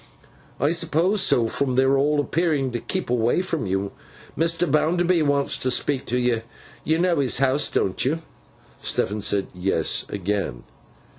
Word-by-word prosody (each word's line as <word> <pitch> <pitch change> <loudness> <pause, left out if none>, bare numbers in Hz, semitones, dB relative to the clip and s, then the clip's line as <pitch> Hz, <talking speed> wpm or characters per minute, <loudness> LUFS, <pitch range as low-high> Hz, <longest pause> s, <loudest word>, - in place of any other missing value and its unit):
'I 145 +4 +2
supposed 170 +4 +1
so, 120 -10 +3
from 130 +2 -1
their 135 +1 +3
all 145 +2 +2
appearing 145 -3 0
to 120 - -3
keep 185 +1 -4
away 120 +8 +1
from 165 - -3
you. 95 +1 -2 0.4
Mr. 165 +2 +1
Bounderby 170 +4 +2
wants 145 -2 +1
to 130 - -1
speak 130 +2 0
to 125 - 0
you. 120 -2 +1 0.4
You 160 - +1
know 175 -2 +1
his 135 -3 +2
house, 135 +1 +2
don't 95 - 0
you?' 160 +5 -1 0.6
Stephen 105 +2 -1
said 100 -1 0
'Yes,' 90 +2 0
again. 100 -10 -3
140 Hz, 155 wpm, -23 LUFS, 115-165 Hz, 0.6 s, so